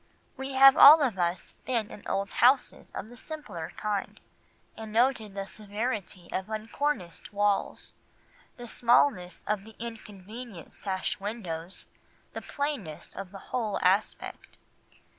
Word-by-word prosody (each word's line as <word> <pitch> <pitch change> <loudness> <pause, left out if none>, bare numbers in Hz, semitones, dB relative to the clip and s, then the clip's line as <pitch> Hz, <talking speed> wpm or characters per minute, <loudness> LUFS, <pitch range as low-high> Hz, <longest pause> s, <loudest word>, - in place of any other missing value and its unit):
We 265 0 -5
have 270 0 +8
all 300 +1 +10
of 230 -8 -1
us 175 +1 -1
been 230 -5 -1
in - - -10
old 195 +1 -1
houses 260 +2 +3
of 215 - -5
the 245 - -13
simpler 260 - -7
kind, 210 -2 -3 0.6
and 220 -1 -8
noted 225 -3 +1
the 195 -1 -3
severity 205 -3 -4
of 190 +2 -3
uncorniced 220 - -3
walls, 205 -1 0 0.6
the 245 - -8
smallness 230 -7 +2
of 210 -2 -1
the 220 0 -14
inconvenient 220 -3 -9
sash 190 -2 -3
windows, 190 -5 -5 0.5
the - - -5
plainness 280 - -4
of 190 -2 -7
the 200 - -8 0.2
whole 220 -5 0
aspect. 190 +4 0
215 Hz, 130 wpm, -28 LUFS, 195-245 Hz, 0.6 s, all